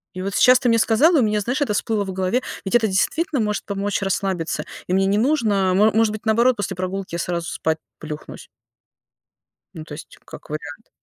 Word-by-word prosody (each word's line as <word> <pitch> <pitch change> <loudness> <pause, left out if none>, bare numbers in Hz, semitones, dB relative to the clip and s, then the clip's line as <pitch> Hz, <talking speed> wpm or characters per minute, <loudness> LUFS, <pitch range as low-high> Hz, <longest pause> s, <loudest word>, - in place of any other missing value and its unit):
И 185 - -5
вот 195 0 -3
сейчас 250 0 +6
ты 250 -3 +1
мне 230 - +4
сказал, 235 +10 +4
и 295 - +5
у - - +3
меня, 210 0 +1
знаешь, 245 +8 -2
это 215 -7 +1
всплыло 210 0 0
в 190 -1 -5
голове, 190 +7 0 0.2
ведь 190 - -1
это 230 -2 +4
действительно 275 - 0
может 210 -1 -2
помочь 200 0 -2
расслабиться, 190 -3 -1 0.2
и 180 - -2
мне 195 0 +3
не 200 - +2
нужно, 215 -8 +2
мо 210 +3 +5
может 220 -1 +2
быть, 215 - -7
наоборот, 235 +3 +4
после 205 -3 -3
прогулки 185 0 -4
я 170 - -3
сразу 170 -1 -3
спать 160 0 -1 0.2
плюхнусь. 155 -1 -9 1.3
Ну, 155 -1 -8
то 155 - -11
есть, 155 - -12
как - - -12
вариант. 155 +6 -7
205 Hz, 210 wpm, -21 LUFS, 185-230 Hz, 1.3 s, сейчас